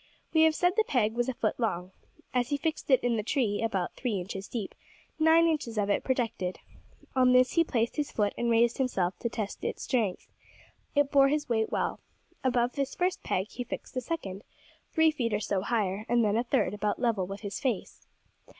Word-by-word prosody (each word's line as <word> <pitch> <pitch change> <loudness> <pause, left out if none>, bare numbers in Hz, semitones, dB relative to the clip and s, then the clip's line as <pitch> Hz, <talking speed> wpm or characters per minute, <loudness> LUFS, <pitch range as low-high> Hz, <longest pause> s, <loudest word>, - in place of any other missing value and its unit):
We 320 - +5
have 320 -1 +3
said 355 +1 +2
the 440 - +4
peg 230 - +1
was 240 +2 0
a 260 - -3
foot 220 +1 -1
long. 185 -6 -1 0.4
As 250 0 +1
he 285 - +1
fixed 315 +1 -3
it 260 - +4
in 240 -2 +1
the - - 0
tree 220 -3 0
about 195 -6 -1
three 230 -7 -2
inches 190 +2 -6
deep, 220 -6 -4 0.5
nine 320 +1 +6
inches 290 -9 -1
of 205 -1 +1
it - - +1
projected. 225 -8 -1 0.6
On 255 -1 +5
this 255 0 +5
he 335 - +4
placed 235 -5 -1
his 295 -1 -1
foot 205 -2 0
and 240 - -1
raised 235 +2 +3
himself 190 -9 0
to 235 - -1
test 215 -2 -5
its - - -3
strength. 220 -8 -1 0.7
It 285 -1 +3
bore 275 -1 +6
his 295 +1 0
weight 220 -3 +1
well. - - -1 0.4
Above 245 -1 +2
this 275 -1 -2
first 360 0 0
peg 190 +4 -1
he 250 - -4
fixed 245 - -7
a 255 - 0
second, 205 - -5 0.5
three 320 -1 +4
feet 235 -8 -1
or - - 0
so 200 -2 -1
higher, 205 -1 -1
and 240 -1 +3
then 210 0 +2
a 235 - +2
third 220 -5 +1
about 210 0 -1
level 225 -7 0
with 195 +1 -7
his 200 -3 -5
face. 250 -8 -3
235 Hz, 210 wpm, -29 LUFS, 205-270 Hz, 0.7 s, nine